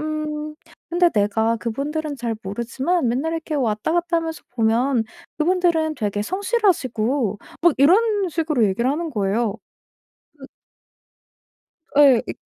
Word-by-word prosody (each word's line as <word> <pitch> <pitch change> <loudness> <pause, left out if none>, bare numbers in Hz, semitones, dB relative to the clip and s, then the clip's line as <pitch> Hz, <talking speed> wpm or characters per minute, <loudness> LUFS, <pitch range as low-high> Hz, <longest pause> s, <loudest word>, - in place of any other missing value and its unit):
음 305 0 -4 0.4
"근데 350 +1 +4
내가 220 +1 +1
그분들은 285 +6 -3
잘 235 -3 -3
모르지만 245 - -1
맨날 270 +8 -1
이렇게 325 -1 -4
왔다 230 -1 0
갔다 340 0 +1
하면서 325 -1 -5
보면 235 +1 +1 0.3
그분들은 330 -1 +1
되게 205 -2 -2
성실하시고..." 270 - 0 0.2
막 345 -3 +5
이런 400 +6 +4
식으로 310 -7 +1
얘기를 235 +6 0
하는 320 +3 -2
거예요. 215 -1 -1 0.8
그 270 - -11 1.5
예. 275 -5 +6
이 - - -5
285 Hz, 270 characters per minute, -22 LUFS, 230-330 Hz, 1.5 s, 예